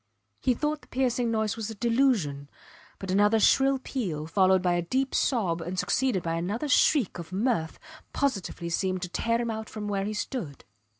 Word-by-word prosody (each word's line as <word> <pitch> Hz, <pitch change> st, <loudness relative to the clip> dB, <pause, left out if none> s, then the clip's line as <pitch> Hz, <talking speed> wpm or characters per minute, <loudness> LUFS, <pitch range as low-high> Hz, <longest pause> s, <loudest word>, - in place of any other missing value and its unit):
He 250 Hz, -, +1 dB
thought 300 Hz, +3 st, -2 dB
the -, -, -19 dB
piercing 250 Hz, -2 st, 0 dB
noise 220 Hz, -2 st, 0 dB
was 225 Hz, -1 st, -4 dB
a 220 Hz, -, -6 dB
delusion. 205 Hz, -, +1 dB, 0.5 s
But 190 Hz, -1 st, -5 dB
another 205 Hz, +3 st, +4 dB
shrill 270 Hz, +6 st, +4 dB
peal 195 Hz, -, -4 dB
followed 185 Hz, +2 st, +3 dB
by 180 Hz, -1 st, +2 dB
a 175 Hz, -, +1 dB
deep 260 Hz, +10 st, -1 dB
sob 185 Hz, -10 st, +1 dB
and 175 Hz, +3 st, -5 dB
succeeded 240 Hz, -3 st, +1 dB
by 165 Hz, 0 st, -1 dB
another 205 Hz, -, -2 dB
shriek 280 Hz, -, +3 dB
of 170 Hz, 0 st, -8 dB
mirth 195 Hz, -5 st, -1 dB, 0.3 s
positively 195 Hz, -10 st, -2 dB
seemed 185 Hz, +1 st, -1 dB
to 180 Hz, -, -4 dB
tear 230 Hz, +5 st, 0 dB
him 235 Hz, -1 st, -1 dB
out 220 Hz, 0 st, -5 dB
from 210 Hz, -1 st, -6 dB
where 200 Hz, -1 st, -1 dB
he 215 Hz, +1 st, -3 dB
stood. 205 Hz, -, -5 dB
210 Hz, 185 wpm, -27 LUFS, 180-245 Hz, 0.5 s, another